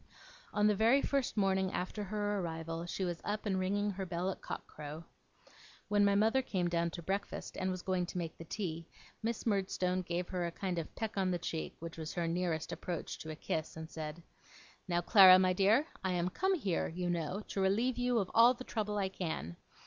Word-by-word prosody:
On 210 - +2
the 210 - +5
very 230 +7 +4
first 275 -5 0
morning 190 -1 +2
after 185 +4 -3
her 205 0 -1
arrival 165 -1 -4
she 190 - -3
was 175 -2 -3
up 210 +1 -2
and 190 -2 +1
ringing 205 +2 0
her 190 0 -4
bell 175 +2 -1
at - - -9
cock - - -5
crow. 150 +2 -8 0.9
When 205 0 +4
my 200 0 +4
mother 220 +6 +4
came 185 -8 -1
down 170 0 +1
to 170 - -6
breakfast 195 +4 -3
and 190 0 -1
was 185 -1 -3
going 185 -2 0
to 180 - -6
make 165 -2 -3
the - - -9
tea, 165 -2 -4 0.3
Miss 230 0 -2
Murdstone 185 -3 +1
gave 175 0 -2
her 180 -2 -1
a - - -4
kind 180 0 -2
of 160 - -7
peck 220 -2 -4
on 190 -1 +2
the 180 - +1
cheek, 165 -2 -4
which 165 0 -8
was 155 -1 -5
her 170 -1 -1
nearest 165 -2 -1
approach 175 -3 -4
to 160 - -7
a 155 - -4
kiss, 155 +1 -3
and 160 0 -7
said: 155 +1 -6 0.6
'Now, 175 -1 +1
Clara, 185 0 +9
my 185 0 +3
dear, 205 +10 +4 0.2
I 190 -1 0
am 175 0 0
come 380 - +1
here, 200 - 0
you 180 +2 -3
know, 175 +3 -1
to 195 - -1
relieve 230 +7 +2
you 245 -1 +2
of 195 -4 0
all 235 +2 +7
the 255 - -8
trouble 210 -4 -2
I 195 -2 +1
can. 160 - -4
185 Hz, 215 wpm, -34 LUFS, 170-205 Hz, 0.9 s, Clara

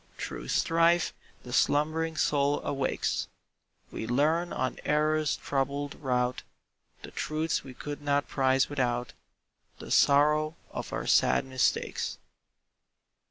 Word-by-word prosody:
Through - - -6
strife 165 +1 +2 0.3
the 125 - -8
slumbering 155 +5 +1
soul 145 -2 +2
awakes, 135 -1 -1 0.6
We 110 - -5
learn 155 +8 +1
on 130 - -2
error's 155 0 +1
troubled 140 +1 -2
route 125 -2 -1 0.6
The - - -9
truths 155 +2 -2
we 130 -2 -11
could 145 +3 -6
not 145 -1 0
prize 130 -1 +2
without 125 -4 -1 0.6
The - - -9
sorrow 150 +2 +4 0.2
of - - -6
our - - -3
sad - - +3
mistakes. 130 -1 -1
145 Hz, 115 wpm, -29 LUFS, 130-155 Hz, 0.6 s, sorrow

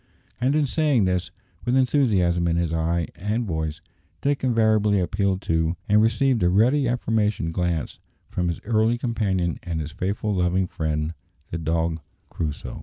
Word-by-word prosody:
And 130 +4 +2
in 155 -1 +3
saying 140 -6 +2
this, 90 -1 0 0.3
with 125 +2 +1
enthusiasm 100 -11 +2
in 85 - +1
his 85 -1 0
eye 85 +1 0
and 110 +5 -2
voice, 80 -3 -3 0.4
Dick 140 -1 0
invariably 110 -4 +3
appealed 95 +1 0
to, 80 +1 0
and 105 +1 +5
received 120 +1 +2
a 90 - +4
ready 125 +9 +3
affirmative 110 -8 0
glance 85 -3 -2 0.3
from, 90 -1 -2
his 85 - -2
early 110 +1 +2
companion 100 -8 -1
and 85 -2 -3
his 75 0 -4
faithful 100 +6 -2
loving 90 0 +1
friend, 80 -2 -2 0.4
the 85 - -3
dog 80 +1 0 0.3
Crusoe. 75 -3 -4
95 Hz, 155 wpm, -24 LUFS, 85-115 Hz, 0.4 s, and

